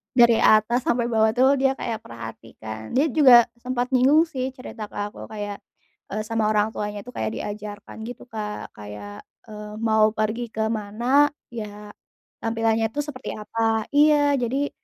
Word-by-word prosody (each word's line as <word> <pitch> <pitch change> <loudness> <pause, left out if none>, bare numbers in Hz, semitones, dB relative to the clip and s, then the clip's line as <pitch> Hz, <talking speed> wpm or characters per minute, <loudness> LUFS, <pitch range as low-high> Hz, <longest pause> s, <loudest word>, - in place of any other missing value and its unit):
Dari 235 -2 +6
atas 215 +3 +4
sampai 235 0 +1
bawah 220 0 +3
tuh 265 +2 +4
dia 270 0 +2
kayak 225 -4 -4
perhatikan. 110 - -9
Dia 280 +4 +4
juga 250 -5 +8 0.2
sempet 250 +1 -2
nyinggung 270 +5 +5
sih, 265 -6 -3
cerita 225 -5 -8
ke - - -17
aku 205 +1 -5
kayak, 205 -2 -6 0.5
eee, 215 +1 -3
sama 225 -1 0
orang 215 0 +2
tuanya 205 -1 -5
itu 250 - -10
kayak 220 - -3
diajarkan 205 0 -7
gitu 245 - -8
Kak. 210 -1 -5
Kayak, 105 0 -9 0.2
eee, 210 0 -8
mau 220 -1 +3
pergi 215 +3 -1
ke 220 0 0
mana, 235 +7 +2 0.2
ya 210 -2 -7 0.5
tampilannya 225 0 +1
itu 290 - -3
seperti 280 -3 -7
apa 225 +2 -4 0.3
iya. 290 -1 +5
Jadi 270 +4 -1
225 Hz, 160 wpm, -24 LUFS, 210-255 Hz, 0.5 s, juga